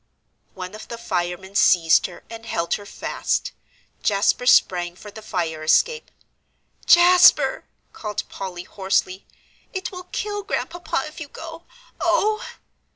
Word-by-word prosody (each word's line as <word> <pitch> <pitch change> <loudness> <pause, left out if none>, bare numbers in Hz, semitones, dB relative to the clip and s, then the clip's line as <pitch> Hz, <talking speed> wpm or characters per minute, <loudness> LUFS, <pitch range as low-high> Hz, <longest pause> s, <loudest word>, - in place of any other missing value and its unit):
One 185 0 -7
of 215 - -10
the 235 - -7
firemen 180 -2 -3
seized 170 -5 +4
her 180 - -13
and 230 0 -10
held 170 -4 -1
her 205 -1 -4
fast. - - -2 0.5
Jasper 205 +4 +1
sprang 175 -6 +4
for 210 +3 -12
the 220 - -11
fire 170 -7 -3
escape. 460 - +2 0.8
"Jasper!" 355 +1 +6 0.3
called 210 -1 -5
Polly, 180 -2 -7
hoarsely, 190 -1 -1 0.5
"it 375 -2 -4
will 360 -1 -9
kill 410 +2 -4
Grandpapa 350 -7 -3
if 305 +2 -10
you 305 - -6
go 325 +3 -10 0.3
oh!" 385 +5 +1
210 Hz, 130 wpm, -22 LUFS, -, 0.8 s, Jasper